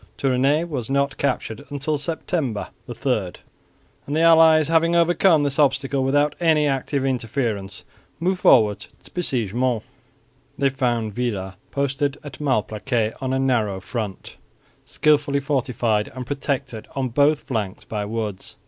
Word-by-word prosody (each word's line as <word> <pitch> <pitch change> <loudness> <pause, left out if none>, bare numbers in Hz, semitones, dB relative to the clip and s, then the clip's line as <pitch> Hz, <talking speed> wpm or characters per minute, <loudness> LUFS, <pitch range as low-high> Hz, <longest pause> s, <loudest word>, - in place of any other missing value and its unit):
Tournay 135 +3 +2
was 140 -9 -4
not 140 0 +1
captured 125 -5 -2
until 145 +1 -2
September 150 - -3 0.2
3; - - -1 0.7
and 145 - -2
the 160 - +2
allies, 160 -2 +6
having 165 +1 +3
overcome 170 -1 +4
this 140 +1 -1
obstacle 135 -1 +2
without 145 +2 +2
any 160 -3 +3
active 135 0 -1
interference, 115 -6 -2 0.3
moved 180 +2 0
forward 105 -4 +4 0.2
to - - -16
besiege 125 - -1
Mons. 120 -2 0 0.7
They 140 -1 +2
found 120 -5 -1
Villars 100 -5 -3 0.2
posted 140 0 -1
at 145 -1 -9
Malplaquet 110 -3 0
on 130 -1 -2
a 130 - +1
narrow 115 -7 +1
front, 105 -1 -6 0.5
skilfully 145 -2 +2
fortified 125 -6 0
and 130 -1 -5
protected 135 -3 -3
on 135 -2 -1
both 145 +4 +2
flanks 105 -6 -4
by 105 -2 -3
woods. 105 -3 -5
135 Hz, 135 wpm, -22 LUFS, 115-145 Hz, 0.7 s, allies